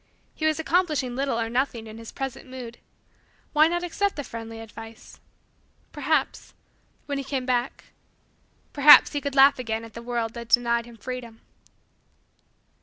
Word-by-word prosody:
He 315 - -1
was 310 - +1
accomplishing 310 -7 0
little 270 -3 -1
or 225 - -1
nothing 240 -1 -1
in 220 0 -10
his 230 - -10
present 270 -1 -6
mood. 245 -2 -9 0.7
Why 305 +1 +6
not 345 +1 -2
accept 395 +3 -1
the 290 - -4
friendly 225 -2 -8
advice? 225 0 -12 0.7
Perhaps - - -1 0.5
when 285 -1 -3
he - - -4
came 270 -1 -3
back 250 0 -1 0.9
perhaps, 290 +1 +8
he 290 - -2
could 280 -1 -4
again 270 -3 +5
laugh 220 +1 -2
at 225 - -14
the 235 - -8
world 235 -1 -3
that 235 -1 -8
denied 235 -1 +2
him 235 -1 -14
freedom. 240 -1 -7
250 Hz, 155 wpm, -25 LUFS, 230-280 Hz, 0.9 s, perhaps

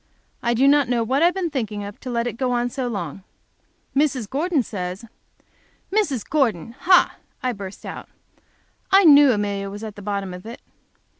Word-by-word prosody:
I 235 0 +1
do 265 +4 +4
not 285 -3 +4
know 240 -2 +1
what 265 +6 0
I - - +6
have 355 - +3
been 360 -4 -2
thinking 220 -7 -3
of 200 0 -8
to 255 - -7
let 235 -1 -1
it 245 - -2
go 255 +1 -1
on 245 0 0
so 260 0 -3
long. 195 -5 -5 0.7
Mrs. 270 -6 +1
Gordon 295 - 0
says 185 0 -5 0.4
" - - -24
"Mrs. 290 - 0
Gordon! 230 - 0
Ha!" 350 +8 +3 0.3
I 250 -1 0
burst 200 -2 -9
out, - - -8 0.8
"I 390 +1 +7
knew 290 -4 +8
Amelia 200 -2 -2
was 205 +2 -8
at 215 -2 -7
the 205 - -10
bottom 200 -2 -3
of 180 0 -9
it! 235 - -8
240 Hz, 195 wpm, -22 LUFS, 205-280 Hz, 0.8 s, knew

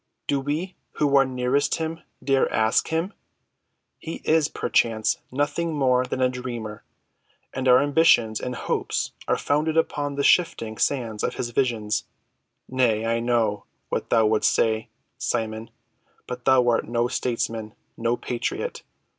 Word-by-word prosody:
Do 140 - 0
we 155 +7 -3 0.2
who 145 -2 +1
are 135 -1 +6
nearest 130 +3 +1
him 165 0 -4 0.2
dare 135 -1 +2
ask 110 0 +2
him? 165 +5 -1 0.9
He 165 - -7
is, 155 -1 +3
perchance, 110 -7 +1
nothing 150 +4 -1
more 130 -3 +2
than 130 - -3
a - - +5
dreamer, 120 -4 -6 0.7
and 130 0 -2
our 125 0 +7
ambitions 140 -7 +4
and 125 0 -4
hopes - - -2 0.2
are - - +2
founded 155 +2 0
upon 145 -3 0
the 140 - -1
shifting 115 - +2
sands 115 -6 0
of - - -1
his 120 - -3
visions. 115 -5 0 0.6
Nay, 120 -4 +1
I 115 0 +1
know 115 -4 0 0.2
what - - -2
thou 110 - +4
wouldst 110 0 +3
say, 110 -1 +1 0.3
Simon. 110 -1 -2 0.6
But 125 -1 -7
thou 130 -2 +5
art 115 - +1
no 120 0 +1
statesman—no 115 -1 -3
patriot. 120 -1 -3
125 Hz, 140 wpm, -24 LUFS, 115-145 Hz, 0.9 s, our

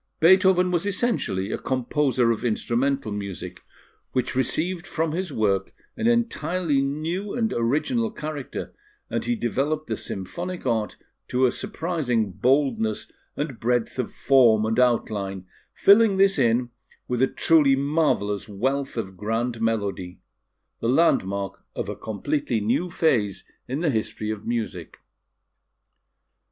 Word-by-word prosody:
Beethoven 185 +1 +5
was 175 +2 0
essentially 195 - 0
a - - -2
composer 130 -1 +1
of 115 - -2
instrumental 120 +2 0
music, 100 -4 -6 0.5
which 130 0 -1
received 170 +7 0
from 160 -3 -1
his 180 +1 -3
work 100 -6 0 0.2
an 225 -1 0
entirely 185 - +1
new 160 +8 -2
and 225 -3 0
original 155 - 0
character, 150 - -6 0.4
and - - -1
he 240 - +1
developed 150 - -1
the 110 - -2
symphonic 175 - -6
art 115 -4 -1 0.3
to 130 +1 +2
a 125 - +3
surprising 155 - -1
boldness 120 -1 +1 0.3
and 140 -5 -3
breadth 120 +1 0
of 125 - -2
form 120 -5 +4
and 110 +2 0
outline, 100 -6 0 0.3
filling 205 0 +5
this 195 0 +4
in 120 +1 +2 0.4
with 125 0 -1
a 130 - +5
truly 150 -3 +4
marvellous 135 - 0
wealth 135 +6 -2
of 95 -4 -4
grand 115 +4 -2
melody 100 -5 -2 0.6
the 115 - -1
landmark 100 - +1
of - - -3
a - - -4
completely 120 +3 -2
new 115 - 0
phase 120 - +1 0.2
in 135 +5 -3
the 165 -4 +2
history 110 -2 -2
of 110 -1 -6
music. 110 -8 -3
130 Hz, 130 wpm, -24 LUFS, 110-165 Hz, 0.6 s, Beethoven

